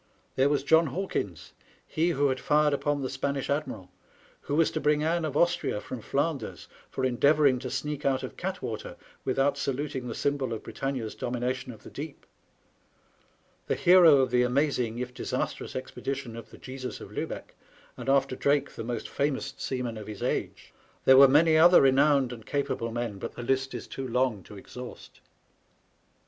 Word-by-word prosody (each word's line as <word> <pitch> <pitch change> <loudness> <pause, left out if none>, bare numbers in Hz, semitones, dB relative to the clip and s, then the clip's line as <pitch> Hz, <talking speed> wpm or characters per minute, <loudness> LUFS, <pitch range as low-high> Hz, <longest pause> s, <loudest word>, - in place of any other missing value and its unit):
There 135 +2 +3
was 145 - +1
John 160 0 +4
Hawkins, 130 - -4 0.3
he 165 +2 0
who 145 -4 +2
had 130 -1 -1
fired 150 0 +3
upon 145 0 0
the - - -1
Spanish 140 +1 -2
admiral, 115 -11 -3 0.5
who 145 - -3
was 165 +1 +3
to - - -3
bring 150 +1 +2
Ann 165 +1 +1
of 150 -2 -2
Austria 170 -10 +1
from 125 +2 -7
Flanders, 140 -1 -2 0.2
for 130 - -2
endeavouring 140 +1 +4
to 130 +1 -5
sneak 145 +2 -3
out 135 -1 +1
of - - -6
Gattwater - - -5 0.3
without 135 +2 +1
saluting 135 -1 -3
the 115 - -5
symbol 140 -4 -1
of 110 - -6
Britannia's 130 -5 -4
domination 125 +1 -3
of 110 - -14
the - - -11
deep; 145 +1 -8 1.4
the - - +1
hero 175 -4 +7
of 130 -2 0
the 125 0 +4
amazing, 125 -2 +1
if 125 0 -4
disastrous, - - -3
expedition 130 -1 -5
of 115 -1 -9
the - - -13
Jesus 130 -1 -7
of - - -10
Luhecky - - -5 0.4
and, - - -5
after 135 -1 +2
Drake, 140 +2 +1
the - - -7
most 115 -1 -4
famous 140 -1 -2
seaman 125 -4 -3
of 105 - -9
his 105 -2 -7
age. - - -3 0.3
There 130 - +8
were 140 0 +10
many 155 +4 +5
other 175 +2 +8
renowned 135 -1 +4
and 115 -2 -10
.capable 140 -4 -2
men, 115 -4 -3
but - - -5
the 120 - -6
list 135 +1 0
is 120 - -6
too 135 -1 -6
long 125 -4 0
to 105 - -11
exhaust. 125 +5 -10
135 Hz, 175 wpm, -28 LUFS, 125-145 Hz, 1.4 s, were